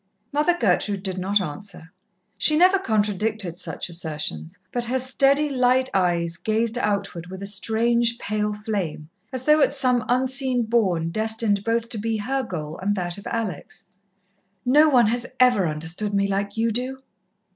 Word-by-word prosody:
Mother 300 +4 +2
Gertrude 200 -2 +1
did 190 -2 -3
not 200 +3 +2
answer 180 0 -8 0.4
she 305 - +3
never 370 +3 +5
contradicted 210 - -1
such - - -3
assertions 150 - -4
but 240 -1 -2
her 250 +3 0
steady, 275 +3 +2
light 255 -1 +2
eyes 170 -3 0
gazed 225 +3 0
outward 200 -6 -2
with 190 +2 -8
a - - -3
strange 230 +3 +1
pale 210 -1 -2
flame, 200 -7 -4 0.2
as 255 -1 -4
though 300 +2 +4
at 280 - +3
some 250 -3 +2
unseen 260 0 +1
bourne 190 -8 +1
destined 220 -1 0
both 230 +1 0
to 225 - -3
be 225 +1 -1
her 265 +6 -1
goal 160 -9 -6
and 200 +2 0
that 175 0 -3
of - - -10
Alex. 200 -4 -4 0.8
"No 300 +5 +5
one 250 -5 +5
has 240 +3 -1
ever 245 -8 +4
understood 165 +7 -3
me 200 0 +2
like 200 +1 -2
you 230 +1 +1
do." 260 +3 -2
215 Hz, 160 wpm, -23 LUFS, 190-250 Hz, 0.8 s, never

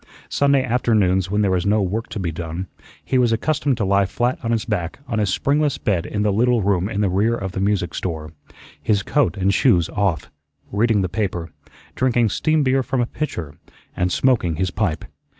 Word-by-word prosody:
Sunday 140 -1 +3
afternoons 105 -7 +1
when 105 +1 +1
there 100 - +2
was 90 -1 +1
no 105 +2 +3
work 105 +5 -3
to - - -5
be 85 -3 -2
done, 85 +3 -5 0.4
he 130 - +1
was 120 -2 +3
accustomed 140 +2 0
to 105 - 0
lie 100 0 +3
flat 120 +5 -1
on 115 - -2
his 115 -2 0
back 90 -7 -2
on 115 -4 -1
his 105 -2 +1
springless 145 +8 +1
bed 95 -6 -1
in 105 0 -2
the 105 -1 +2
little 120 +1 +2
room 95 -1 +1
in 105 -2 -2
the 105 - +2
rear 100 +6 +1
of 95 -4 -4
the 95 - -4
music 95 -4 0
store, 80 -3 -4 0.5
his 105 -3 +1
coat 145 -4 +1
and 100 +1 +2
shoes 90 -11 +3
off, 95 -9 -1 0.4
reading 110 0 +2
the - - 0
paper, 90 -3 -3 0.4
drinking 120 -3 +2
steam 155 +7 +1
beer 135 0 +2
from 130 0 -2
a 120 - +2
pitcher, 85 - -5 0.4
and 90 0 0
smoking 110 -8 +2
his 95 +2 -1
pipe. 90 -6 -1
105 Hz, 205 wpm, -21 LUFS, 90-120 Hz, 0.5 s, Sunday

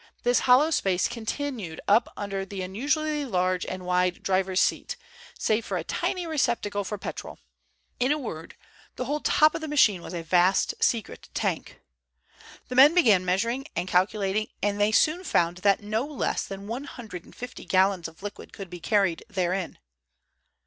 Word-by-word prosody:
This 245 0 +3
hollow 280 +6 +6
space 190 - +1
was - - -7
continued 230 - -4
up 220 +4 +4
under 195 -1 -3
the 195 -1 -6
unusually 295 - -1
large 185 -6 0
and 185 -1 -5
wide 180 0 +1
driver's 190 -1 +1
seat, 485 - 0 0.4
save 220 +1 +1
for - - -3
a - - -3
tiny 365 -2 -2
receptacle 235 -10 0
for 210 +2 -4
petrol. 195 - -7 0.6
In 250 +3 +2
a 300 - +2
word 165 - -7 0.4
the - - -3
whole 295 +1 -1
top 305 +1 +4
of - - -4
the 315 - -4
machine 225 - +3
was 175 - -7
a 170 - -4
vast 180 +3 +3
secret 230 -3 -1
tank. - - -2 0.9
The - - -6
men 285 +6 +8
began 220 - +5
measuring 230 +9 -1
and 175 +2 -2
calculating, 195 +3 +1 0.2
and 205 0 0
they 205 +1 +3
soon 310 - +3
found 175 - +1
that 200 +2 +2
no 215 +3 -1
less 295 -4 -2
than 195 0 -7
one 240 +6 -5
hundred 215 -11 -9
and - - -17
fifty 245 0 -8
gallons 190 -2 +2
of 165 +3 -16
liquid 205 0 -8
could 195 -3 -9
be 175 - -7
carried 195 -3 +1
therein. 185 -2 -2
205 Hz, 175 wpm, -26 LUFS, 185-250 Hz, 0.9 s, men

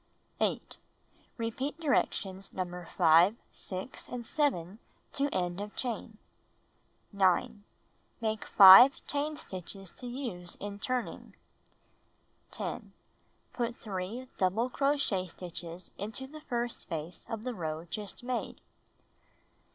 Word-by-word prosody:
8. - - -1 0.6
Repeat 255 +7 -3
directions 195 - 0
No. 180 -1 -4
5, 170 +6 +6 0.2
6, 190 +7 -6
and 245 -1 -6
7 215 - 0 0.3
to 280 +1 +1
end 180 -4 -1
of 210 0 -7
chain. 225 -3 -4 1.0
9. 200 +3 +2 0.6
Make 220 -2 -1
5 200 +7 +9
chain 295 +1 -2
stitches 190 - -8
to 250 - -9
use 235 -9 -5
in 205 0 -6
turning. 250 +2 -3 1.1
10. - - -5 0.6
Put 240 -1 -2
3 210 +5 -5
double 215 +7 +1
crochet 275 -11 +1
stitches 175 0 -8
into 220 +6 -5
the 305 +3 -11
first 240 -4 -2
space 165 +2 -6
of 225 -1 -4
the 250 0 -3
row 160 -4 -4
just 205 +6 -5
made. 250 0 -3
210 Hz, 110 wpm, -31 LUFS, 185-250 Hz, 1.1 s, 5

